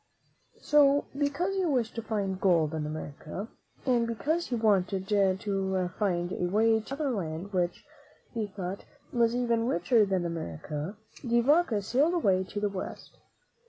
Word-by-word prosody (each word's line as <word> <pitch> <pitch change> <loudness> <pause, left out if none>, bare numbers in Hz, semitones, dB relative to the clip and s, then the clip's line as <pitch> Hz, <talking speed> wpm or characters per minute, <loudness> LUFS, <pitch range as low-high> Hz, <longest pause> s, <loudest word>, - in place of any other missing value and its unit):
So, 285 -1 +5
because 290 +7 0
he 380 - +1
wished 255 -9 0
to 230 - -4
find 200 -4 -2
gold 165 -5 +3
in 155 -1 -2
America 155 +5 -6 0.4
and 240 -3 +2
because 310 +9 -1
he 245 - -1
wanted 195 -4 +1
to 190 -2 +1
find 175 -4 0
a 180 - -1
way 220 +3 +3
to 240 +5 -6
another 285 -2 -1
land 180 -2 -4
which, 175 -1 -1 0.5
he 225 -3 -2
thought, 190 -1 -6 0.3
was 235 -1 +3
even 235 -2 +1
richer 225 +2 +3
than 190 -2 0
America, 155 - -5 0.2
De 240 -3 +2
Vaca 270 - +3
sailed 285 - +2
away 190 - +2
to 205 - -5
the 205 - +1
West. 195 -2 -7
205 Hz, 155 wpm, -29 LUFS, 185-245 Hz, 0.5 s, So